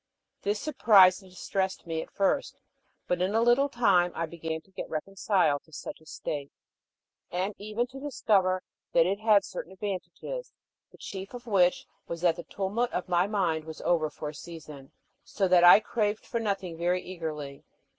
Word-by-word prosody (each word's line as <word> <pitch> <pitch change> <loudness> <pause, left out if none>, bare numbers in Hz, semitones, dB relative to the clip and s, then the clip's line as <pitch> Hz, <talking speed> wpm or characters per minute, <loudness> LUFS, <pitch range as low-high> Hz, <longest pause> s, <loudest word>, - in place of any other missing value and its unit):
This 205 +1 -1
surprised 200 -10 +5
and 190 - -16
distressed 190 +1 -2
me 165 -1 -2
at - - -9
first, 200 +8 0 0.5
but 180 0 0
in 190 +4 +1
a 225 - +4
little 240 +4 +4
time 195 -8 +3
I 165 - -1
began 160 -1 -5
to 190 - -28
get - - -6
reconciled 165 -2 +1
to 160 - -23
such 155 - -8
a 160 - -20
state, 140 -2 -5 0.8
and 185 +4 -2
even 215 +3 -2
to 260 +2 -11
discover 195 -10 +1 0.3
that 165 - +5
it 195 +3 0
had 215 -2 +4
certain 185 - -7
advantages, 205 - -5 0.4
the - - -17
chief 195 +4 -7
of 245 0 -9
which 185 -5 +3 0.2
was 170 0 -5
that 175 -2 +3
the 170 - -6
tumult 205 +5 -2
of 180 - -3
my 175 +1 +3
mind 175 -7 0
was 160 -1 -8
over 160 -3 +1
for 150 0 -6
a - - -8
season, 150 -4 -10 0.3
so 195 - -1
that 180 -1 +5
I 175 +3 +10
craved 215 -1 -1
for 235 - -2
nothing 195 -6 -3
very 180 +1 +1
eagerly. 155 -6 -6
185 Hz, 180 wpm, -28 LUFS, 165-210 Hz, 0.8 s, I